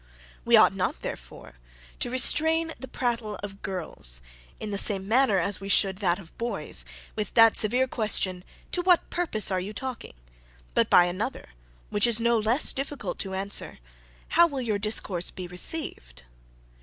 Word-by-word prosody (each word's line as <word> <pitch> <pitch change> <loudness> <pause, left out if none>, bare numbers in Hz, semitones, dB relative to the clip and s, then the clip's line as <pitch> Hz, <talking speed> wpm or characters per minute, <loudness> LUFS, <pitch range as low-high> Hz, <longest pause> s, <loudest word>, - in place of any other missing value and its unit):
"We - - +5
ought - - +5
not, - - -3
therefore, - - -9 0.4
to - - -1
restrain 320 +6 +4
the 260 - -8
prattle 235 -4 -3
of 195 0 -8
girls, 165 - -2 0.4
in 215 - -5
the 200 - -2
same 195 -2 +3
manner 235 -2 +3
as 190 +2 0
we 195 - -7
should 190 -1 +3
that 180 -4 +1
of 175 -4 -14
boys, 200 - -2 0.3
with 210 -2 -5
that 225 -1 +6
severe 245 +5 +2
question, 200 -6 0 0.3
'To 355 - 0
what 355 -1 +2
purpose 270 - 0
are 185 - 0
you 195 +4 -6
talking?' 255 - -7 0.6
but - - +1
by 175 - +6
another, 185 - -4 0.4
which 205 +3 +3
is 235 -1 +4
no 235 0 +2
less 225 +7 +1
difficult 275 +1 -5
to 190 -1 -3
answer, 195 +1 -1 0.5
'How 340 +1 +5
will 280 -5 -5
your 215 -4 -2
discourse 200 -4 -1
be 185 - -8
received?' 175 - -4
215 Hz, 165 wpm, -26 LUFS, 190-250 Hz, 0.6 s, that